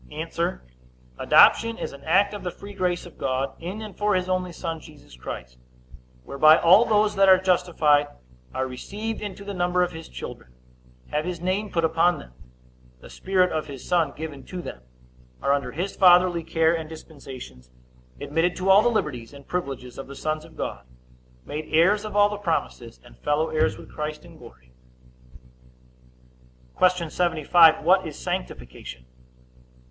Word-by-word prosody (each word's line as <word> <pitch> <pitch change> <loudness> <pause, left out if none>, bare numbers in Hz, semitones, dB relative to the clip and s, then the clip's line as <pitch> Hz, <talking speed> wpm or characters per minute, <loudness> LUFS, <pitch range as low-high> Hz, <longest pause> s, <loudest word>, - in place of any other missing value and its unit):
A. 60 - -3 0.6
Adoption 230 0 +5
is - - -5
an 140 0 -13
act 195 +6 +3
of 205 - -6
the 180 - -3
free 200 +3 -11
grace 180 -3 -1
of 175 - -14
God, 135 0 -1
in 190 +6 -6
and 210 -4 -9
for 205 -1 +1
his 185 0 -1
only 185 -1 -1
Son 165 -1 -5
Jesus 150 - -16
Christ, 60 0 -8 0.6
whereby 155 - +5
all 190 +8 +6
those 210 -1 +2
that 195 -1 +5
are 190 - +8
justified 175 -6 +2 0.4
are 130 - -2
received 205 - -6
into 200 -1 -7
the 200 - -5
number 180 0 +1
of 180 - -2
his 160 0 -10
children, 60 0 -9 0.6
have 150 +1 0
his 175 0 -4
name 190 +4 -2
put 165 -3 0
upon 165 +1 +2
them, 60 - -13 0.7
the - - -14
Spirit 185 -1 +1
of 155 -1 -3
his 135 -3 -9
Son 165 -5 +2
given 150 -3 -7
to 185 - -7
them, 65 - -8 0.6
are 140 - +1
under 140 -3 -2
his 180 +7 -4
fatherly 180 -2 +5
care 165 0 +2
and 160 -2 -5
dispensations, 130 - -11 0.5
admitted 165 +4 0
to 190 +1 +1
all 195 +2 +7
the 240 - +3
liberties 145 - -3
and 140 -1 -14
privileges 135 -8 -5
of 135 - -7
the 140 - -10
sons 155 +1 -3
of 160 - -16
God, - - -5 0.6
made 155 +1 -6
heirs 190 +7 +3
of 210 - -7
all 205 0 +6
the 210 0 -5
promises, 160 - -3
and 120 - -17
fellow 150 +2 0
heirs 95 -11 0
with - - -14
Christ 150 +1 -5
in 170 -2 -15
glory. 60 0 -16 2.1
Q. 180 -2 +3
75. 165 -1 +4
What 185 0 +4
is 150 - -8
sanctification? 65 - -6
165 Hz, 170 wpm, -24 LUFS, 145-185 Hz, 2.1 s, are